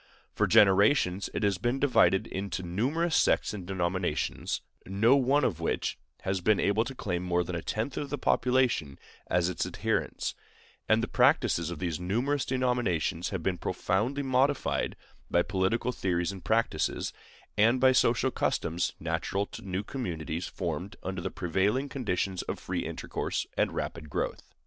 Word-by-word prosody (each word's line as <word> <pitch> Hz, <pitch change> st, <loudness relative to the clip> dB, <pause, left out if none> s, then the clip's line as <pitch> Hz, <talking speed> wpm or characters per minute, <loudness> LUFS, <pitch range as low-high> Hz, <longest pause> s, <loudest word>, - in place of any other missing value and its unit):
For -, -, +2 dB
generations 100 Hz, -1 st, +4 dB
it -, -, -3 dB
has 100 Hz, -3 st, +1 dB
been 120 Hz, +5 st, 0 dB
divided 125 Hz, -8 st, +4 dB
into 95 Hz, -1 st, -4 dB
numerous 135 Hz, -, 0 dB
sects -, -, +3 dB
and 95 Hz, -4 st, -7 dB
denominations, 90 Hz, -3 st, -1 dB, 0.3 s
no 105 Hz, +7 st, +4 dB
one 140 Hz, +2 st, +3 dB
of 90 Hz, -10 st, 0 dB
which 85 Hz, -, -1 dB, 0.2 s
has 95 Hz, -1 st, -1 dB
been 105 Hz, +3 st, +3 dB
able 105 Hz, +3 st, +2 dB
to 130 Hz, -, -6 dB
claim 90 Hz, -7 st, -2 dB
more 90 Hz, -1 st, +1 dB
than 90 Hz, 0 st, -5 dB
a 85 Hz, -, -2 dB
tenth 110 Hz, +9 st, -3 dB
of 145 Hz, -, -3 dB
the 145 Hz, -, -2 dB
population 125 Hz, -, +1 dB, 0.3 s
as 90 Hz, -1 st, +2 dB
its 90 Hz, -3 st, -1 dB
adherents; -, -, -2 dB, 0.6 s
and -, -, +4 dB
the -, -, 0 dB
practices 85 Hz, -1 st, +3 dB
of 85 Hz, -, -5 dB
these 80 Hz, -1 st, -2 dB
numerous 120 Hz, +10 st, 0 dB
denominations 125 Hz, -10 st, 0 dB
have 95 Hz, -4 st, -4 dB
been 90 Hz, 0 st, -1 dB
profoundly 105 Hz, +10 st, -1 dB
modified 135 Hz, +1 st, +1 dB, 0.3 s
by 85 Hz, -, +3 dB
political 95 Hz, +7 st, 0 dB
theories 90 Hz, -5 st, -1 dB
and 95 Hz, -2 st, -9 dB
practices, 115 Hz, +1 st, 0 dB, 0.4 s
and 115 Hz, +4 st, +4 dB
by 130 Hz, 0 st, +6 dB
social 130 Hz, 0 st, +3 dB
customs 85 Hz, -6 st, -1 dB
natural 100 Hz, +1 st, -1 dB
to -, -, -10 dB
new 95 Hz, +1 st, -3 dB
communities 85 Hz, -, -4 dB
formed 90 Hz, +2 st, -4 dB
under 95 Hz, -1 st, -3 dB
the -, -, -2 dB
prevailing 95 Hz, -, 0 dB
conditions 100 Hz, -8 st, -2 dB
of -, -, -4 dB
free -, -, -3 dB
intercourse -, -, -3 dB
and -, -, +1 dB
rapid 75 Hz, -, -4 dB
growth. -, -, -3 dB
100 Hz, 160 wpm, -29 LUFS, 90-125 Hz, 0.6 s, by